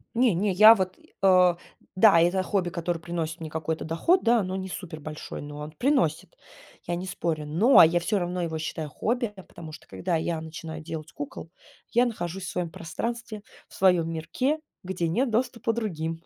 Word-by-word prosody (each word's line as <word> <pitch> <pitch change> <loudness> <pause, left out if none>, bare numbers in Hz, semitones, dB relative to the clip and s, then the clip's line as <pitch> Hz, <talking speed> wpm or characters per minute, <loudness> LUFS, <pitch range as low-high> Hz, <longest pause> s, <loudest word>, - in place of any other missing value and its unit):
Не 240 -2 +4
не, 195 +4 +1
я 215 +4 +9
вот, 185 -2 -2 0.2
э 185 -2 +5 0.4
Да, 185 -3 +6
это 175 +3 +2
хобби, 185 -2 0
которое 170 0 -3
приносит 165 -1 -4
мне 160 - -5
какой-то 160 0 -3
доход, 250 - +2
да, 235 0 +4
оно 185 -1 -2
не 190 0 -4
супер 175 -4 -7
большой, 155 0 -7
но 145 0 -8
он 150 +1 -6
приносит, 240 - 0 0.5
я 175 - -1
не 180 +2 -5
спорю. 165 -4 -3
Но, 175 - +6
я 170 +2 +4
всё 205 +4 0
равно 180 0 -2
его 165 -2 -2
считаю 160 -1 -4
хобби, 235 - -1
я 190 - -11
потому 160 -3 -11
что - - -12
когда 175 -1 -2
я 160 0 -1
начинаю 160 0 -7
делать 155 -1 -7
кукол, 145 +3 -8 0.4
я 240 +2 +4
нахожусь 190 -5 -4
в - - -4
своём 180 -2 -3
пространстве, 215 +7 -5 0.2
в - - -20
своём 180 -3 +3
мирке, 210 - -1 0.2
где 180 -2 -2
нет 245 +10 +1
доступа 230 0 0
другим. 165 -7 -3
175 Hz, 190 wpm, -26 LUFS, 160-205 Hz, 0.5 s, я